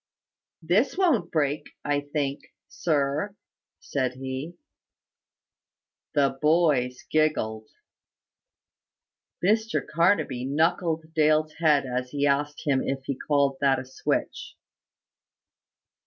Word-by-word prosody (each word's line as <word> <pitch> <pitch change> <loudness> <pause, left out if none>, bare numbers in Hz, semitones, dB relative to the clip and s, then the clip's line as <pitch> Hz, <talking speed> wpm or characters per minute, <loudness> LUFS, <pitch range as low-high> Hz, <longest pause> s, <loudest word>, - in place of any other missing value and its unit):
"This 200 - +2
won't 340 - +2
break, 150 -2 -1
I 145 0 +1
think, 145 -1 -3 0.3
sir," 160 - -1 0.4
said 130 -3 -2
he. 130 +5 -5 1.6
The 140 -2 +2
boys 150 -6 +2
giggled. 110 -9 0 1.8
Mr 220 +3 +1
Carnaby 165 -6 +1
knuckled 160 +2 0
Dale's 155 -1 +2
head 150 -4 +3
as 125 0 -3
he 145 +1 -1
asked 145 +1 0
him 135 -3 +2
if 135 0 -3
he 140 - -2
called 140 0 +1
that 135 -1 +4
a - - -5
switch. 485 - -3
145 Hz, 95 wpm, -26 LUFS, 135-165 Hz, 1.8 s, that